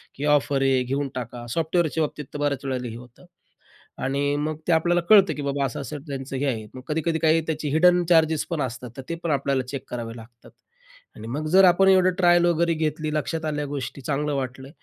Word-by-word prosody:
की 140 - -4
ऑफर 140 -1 0
आहे 135 -2 +2
घेऊन 140 +3 -2
टाका. 120 -1 -6
सॉफ्टवेअरच्या 165 -1 0
बाबतीत 150 -1 -5
तर 145 - -5
बऱ्याच 145 -2 -1
वेळेला 125 -2 -2
हे 115 - -8
होतं 125 +7 -15 0.8
आणि 140 +2 0
मग 155 +1 -2
ते - - +4
आपल्याला 175 +2 +3
कळतं, 200 -3 +7
की 145 - -5
बाबा 140 0 -1
असं 130 - -5
असं 140 +2 -6
त्यांचं 135 -1 -5
हे 140 +2 -1
आहे. 110 -5 -2
मग 130 - -9
कधी-कधी 160 +1 0
काही 160 +1 +4
त्याचे 155 -2 -2
हिडन 175 +3 +4
चार्जेस 160 -2 +4
पण 165 -3 -2
असतात, 125 -1 -5
तर 135 - -6
ते 170 - -2
पण 165 - -1
आपल्याला 140 -2 +1
चेक 140 -1 -5
करावे 115 -1 -5
लागतात. 120 +1 -14 0.7
आणि 110 - -9
मग 150 +6 -3
जर 190 +3 +6
आपण 185 +1 +5
एवढं 185 -1 +5
ट्रायल 175 -1 +5
वगैरे 170 0 +2
घेतली, 155 0 -2
लक्षात 160 +1 -2
आल्या 150 -1 -2
गोष्टी, 140 -1 -5
चांगलं 145 +2 -1
वाटलं. 130 0 -4
145 Hz, 210 wpm, -24 LUFS, 130-160 Hz, 0.8 s, कळतं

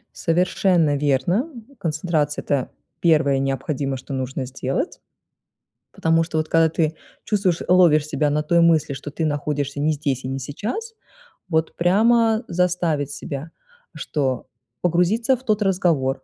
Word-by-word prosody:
Совершенно 170 -2 +2
верно. 150 - +1 0.3
Концентрация- 155 -3 -1
это 140 -3 -1 0.3
первое 150 -5 +3
необходимое, 135 0 -2
что 130 +2 -9
нужно 130 0 -3
сделать. 135 +1 -3 0.9
Потому 165 0 +2
что 160 -1 -4
вот 155 - 0
когда 165 -1 +4
ты 160 -1 0 0.3
чувствуешь 195 -5 +1
ловишь 170 -5 +5
себя 150 -1 0
на 150 +1 +1
той 170 +2 +3
мысли, 160 -4 +3
что 140 +2 -7
ты 160 +2 -2
находишься 145 -1 -2
не 150 +2 +2
здесь 140 -4 -2
и - - -4
не 135 +1 -3
сейчас, 225 - -5 0.6
вот 160 -1 0
прямо 225 +5 +3
заставить 170 -5 0
себя, 145 +3 -6 0.4
что 130 -4 -2 0.3
погрузиться 180 +9 +2
в 255 - -19
тот 215 -4 0
разговор. 165 -9 +1
155 Hz, 135 wpm, -22 LUFS, 140-180 Hz, 0.9 s, ловишь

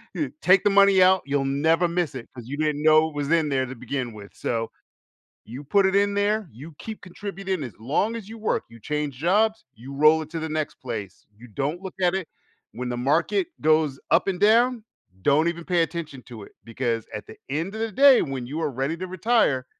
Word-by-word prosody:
eh, - - -1
take 185 0 +5
the 205 - +4
money 200 -1 +5
out, 185 0 +5
you'll 140 0 0
never 160 +6 +2
miss 170 -3 -1
it, 120 -3 -8
'cause 120 -3 -9
you 140 - -4
didn't 150 -1 -1
know 155 0 +5
it 155 - -15
was 145 0 -2
in 165 -3 +3
there 130 -2 0
to 130 - -7
begin 125 0 -4
with. 100 -1 -11
So, 115 -1 -3 0.7
you 120 +5 -9
put 195 +7 +3
it 190 - +2
in 200 0 +3
there, 205 0 0
you 150 +8 -11
keep 220 -1 -8
contributing 195 -2 -5
as 120 -6 -7
long 155 - 0
as 220 -3 -8
you 225 - -9
work. 220 - -1
You 115 - -14
change 150 +2 -3
jobs, 210 +8 +1
you 130 +5 -10
roll 155 +3 +5
it 155 - -8
to 165 - -4
the 160 - -3
next 155 -1 -3
place. 105 -7 -7
You 120 +3 -13
don't 140 - -3
look 190 -1 -8
at 180 +1 +2
it. 190 -4 -3 0.5
When 125 +1 -5
the 120 - -2
market 165 +9 +1
goes 155 -3 +2
up 165 +4 +4
and 180 - -3
down, 230 +3 +4 0.4
don't 150 - +3
even 170 0 -6
pay 175 -2 +2
attention 160 -5 -6
to 115 -4 -9
it, - - -15
because 115 -1 -2
at 105 - -6
the - - -11
end 165 +8 -2
of 220 - -4
the 225 -1 -2
day, 275 +4 +6
when 135 -3 -4
you 155 +4 -4
are 150 - -1
ready 135 +5 -2
to 185 - -5
retire, 185 - +1
155 Hz, 225 wpm, -24 LUFS, 135-190 Hz, 0.7 s, day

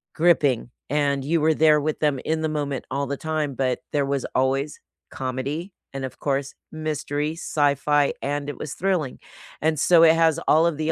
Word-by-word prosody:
gripping, 150 -8 +2 0.2
and 140 -2 +1
you 165 +3 +1
were 160 +1 +4
there 155 -1 +4
with 155 +1 -2
them 145 -3 +1
in 160 0 0
the 155 - 0
moment 145 -3 -3
all 140 0 -1
the 140 0 -3
time, 155 -3 -2
but 130 -1 0
there 145 -1 +2
was 140 -1 -1
always 135 +3 0 0.3
comedy, 140 +8 -4 0.2
and 135 -1 -4
of 130 - -9
course, 140 -1 -1 0.2
mystery, 155 -1 -2
sci-fi, 145 -2 +1
and 145 +1 -2
it - - -6
was 150 - -5
thrilling, 180 -8 -1 0.4
and 155 -1 +1
so 170 0 +5
it 160 0 +7
has 165 -1 +3
all 160 +2 +5
of 160 - -1
the 155 +1 0
150 Hz, 185 wpm, -24 LUFS, 140-160 Hz, 0.4 s, it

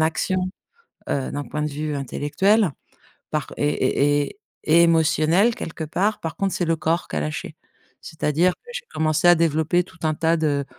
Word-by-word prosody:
action, 160 +4 +1 0.7
heu, 135 -2 -1
d'un 145 - -3
point 150 +4 -4
de 150 - -1
vue 150 +1 -3
intellectuel 165 - +1 0.6
parc 150 -2 -3
et 145 0 +1
et - - -10 0.3
et 165 +2 +5
émotionnel 165 +6 +3
quelque 165 -8 -6
part. 205 +7 -1
Par 165 -2 -5
contre, 195 -1 -1
c'est 175 - 0
le 165 0 +1
corps 165 +2 -1
qui - - -5
a - - 0
lâché. 75 +1 -5 0.4
C'est-à-dire 160 +3 0
que 485 - -16
j'ai - - -6
commencé 155 +1 +1
à 175 - +9
développer 160 +2 +1
tout 170 - -19
un 155 -1 +1
tas 165 +2 +1
de 145 -3 0
160 Hz, 180 wpm, -23 LUFS, 150-175 Hz, 0.7 s, à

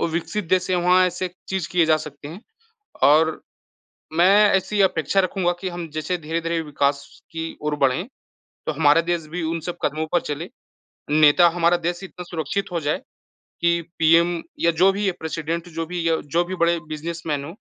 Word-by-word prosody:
वो - - +1
विकसित 175 +5 -3
देश 185 -1 +2
हैं, 185 - +2
वहाँ 180 +1 +4
ऐसे 180 +1 -3 0.2
चीज़ 190 -4 -2
किए 175 -1 +3
जा 155 0 +4
सकते 150 -2 -9
हैं 170 +6 -9 0.6
और 155 +3 +4 0.8
मैं 175 +2 +5 0.3
ऐसी 190 +2 0
अपेक्षा 185 0 +2
रखूँगा 185 -1 0
कि 190 - -3
हम 175 -1 -6
जैसे 155 +4 -2
धीरे-धीरे 165 +1 -2
विकास 140 -2 0 0.3
की 165 0 -5
ओर 150 0 0
बढ़ें 150 - +1 0.6
तो - - +1
हमारा 150 +1 +4
देश 170 -1 -2
भी 180 - -3
उन 165 +1 -2
सब 175 - -4
कदमों 155 +2 -1
पर 175 - +3
चलें। 150 +5 -5 0.6
नेता 155 +3 +6
हमारा 170 +1 +2
देश 175 +2 -3
इतना 180 -1 -8
सुरक्षित 175 +5 -3
हो 170 - 0
जाए 150 +1 -1 0.6
कि 170 0 +2 0.2
पीएम 165 +1 +4 0.2
या 170 - +3
जो 195 - +7
भी 200 0 0
प्रेसिडेंट 165 +1 -4
जो 165 0 -3
भी 175 -1 -3
या 165 - +3 0.2
जो 175 - +4
भी 185 - -5
बड़े 170 -1 +2
बिज़नेसमैन 155 -2 -4
हों, 165 - -8
170 Hz, 185 wpm, -22 LUFS, 155-180 Hz, 0.8 s, जो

